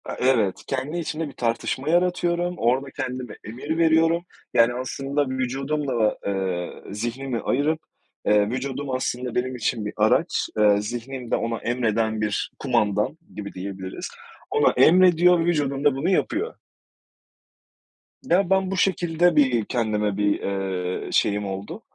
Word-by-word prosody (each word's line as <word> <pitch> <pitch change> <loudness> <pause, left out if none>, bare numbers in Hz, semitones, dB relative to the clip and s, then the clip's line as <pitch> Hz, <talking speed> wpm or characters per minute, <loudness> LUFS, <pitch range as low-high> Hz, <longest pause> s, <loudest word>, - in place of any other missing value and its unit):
A, - - -5
evet. 120 -7 +2
Kendi 135 +5 -2
içimde 160 -1 -3
bir 140 - -10
tartışma 120 +4 -2
yaratıyorum, 175 0 +1
orada 130 +4 +1
kendime 125 -4 -5
emir 130 +9 -4
veriyorum, 165 +1 +3 0.3
yani 120 0 +5
aslında 135 +3 -2
vücudumla 135 +1 -2
da, 110 -1 +2
ııı, 95 -1 -3
zihnimi 120 +3 -3
ayırıp, 150 +4 +1 0.5
ııı, 105 0 +4
vücudum 135 +3 -3
aslında 125 -1 -2
benim 130 +1 -1
için 115 -2 -1
bir 105 - -4
araç, - - +2
ııı, 105 -1 +4
zihnimde 120 +3 -4
ona 115 0 -2
emreden 110 -2 0
bir 105 -2 -1
kumandan 110 0 +1 0.2
gibi 100 -1 -6
diyebiliriz. 95 0 -6 0.4
Ona - - +4
emrediyor, 180 0 +5
vücudum 145 -5 0
da 145 -2 +4
bunu 145 +7 0
yapıyor. 350 - 0 1.7
Ya 195 -7 +2
ben 190 0 +2
bu 195 - -2
şekilde 175 -2 +2
bir, 130 -7 +3
kendime 105 -4 -1
bir, 105 0 +1
ııı, 95 -2 -3
şeyim 105 0 +2
oldu. 95 +1 -6
130 Hz, 135 wpm, -24 LUFS, 105-155 Hz, 1.7 s, yani